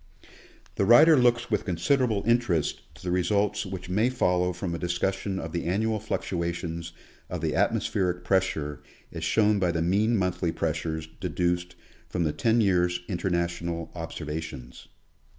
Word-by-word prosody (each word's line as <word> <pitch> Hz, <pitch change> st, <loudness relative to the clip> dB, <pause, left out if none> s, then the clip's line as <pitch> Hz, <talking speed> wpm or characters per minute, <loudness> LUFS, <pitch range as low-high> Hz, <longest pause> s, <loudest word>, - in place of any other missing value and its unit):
The -, -, +2 dB
writer 150 Hz, +10 st, +8 dB
looks 120 Hz, -2 st, +2 dB
with 105 Hz, -, +1 dB
considerable 110 Hz, +4 st, +1 dB
interest 115 Hz, -10 st, +1 dB
to -, -, -15 dB
the 90 Hz, -, -2 dB
results 100 Hz, +3 st, +1 dB
which 95 Hz, -1 st, -6 dB
may 105 Hz, +7 st, +2 dB
follow 90 Hz, -7 st, +1 dB
from 90 Hz, 0 st, -4 dB
a 85 Hz, -, -3 dB
discussion 95 Hz, +3 st, -1 dB
of 80 Hz, -3 st, -5 dB
the 85 Hz, -, -3 dB
annual 110 Hz, +5 st, 0 dB
fluctuation 85 Hz, -5 st, -3 dB, 0.5 s
of -, -, -4 dB
the -, -, 0 dB
atmospheric 90 Hz, -1 st, 0 dB
pressure 80 Hz, -7 st, 0 dB, 0.3 s
as -, -, -6 dB
shown 105 Hz, -2 st, +3 dB
by 90 Hz, -2 st, +2 dB
the 80 Hz, -1 st, -1 dB
mean 105 Hz, +6 st, +2 dB
monthly 90 Hz, -2 st, 0 dB
pressures 80 Hz, -1 st, -2 dB
deduced 90 Hz, 0 st, -1 dB, 0.3 s
from 90 Hz, -, -1 dB
the 75 Hz, -2 st, 0 dB
ten 115 Hz, +9 st, +2 dB
years' 90 Hz, -3 st, +2 dB
International 85 Hz, -2 st, -2 dB
observations. 80 Hz, -6 st, -6 dB
90 Hz, 145 wpm, -27 LUFS, 85-105 Hz, 0.5 s, writer